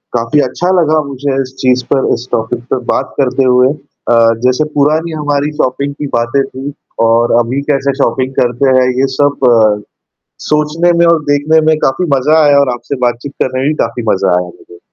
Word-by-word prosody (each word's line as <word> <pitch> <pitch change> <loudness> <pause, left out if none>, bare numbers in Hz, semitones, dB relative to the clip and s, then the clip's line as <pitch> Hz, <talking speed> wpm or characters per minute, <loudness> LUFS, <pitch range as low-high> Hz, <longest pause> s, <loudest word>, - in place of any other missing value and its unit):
काफ़ी 120 +5 +1
अच्छा 175 +7 -3
लगा 155 -1 +2
मुझे 140 0 -3
इस 130 0 -8
चीज़ 125 -1 +1
पर, 135 - +1
इस 120 - -5
टॉपिक 115 +2 -2
पे - - +2 0.2
बात - - -3
करते 135 0 +1
हुए। 125 0 +4
अ, 145 -4 -4 0.3
जैसे 130 +4 +2
पुरानी 155 +4 +1
हमारी 145 0 -1
शॉपिंग 140 +2 -2
की 145 +1 -6
बातें 120 +4 0
थी 135 +2 -7 0.4
और 115 +1 +2
अभी 120 +4 -1
कैसे 140 -1 +1
शॉपिंग 130 +3 -1
करते 125 +2 +1
हैं 125 - +2
ये 135 - +2
सब 120 -7 +2 0.7
सोचने 150 +3 +1
में 170 - +4
और 170 -2 +3
देखने 145 +2 +2
में 160 0 +3
काफ़ी 135 +7 -1
मज़ा 150 +5 +2
आया 145 -1 +4
और 140 -2 +1
आपसे 120 +3 -5
बातचीत 120 +4 -4
करने 130 0 -2
में 135 - 0
भी 155 - 0
काफ़ी 120 - -5
मज़ा 95 -2 +1
आया 90 - -5
मुझे। 85 0 -15
135 Hz, 190 wpm, -12 LUFS, 125-145 Hz, 0.7 s, हुए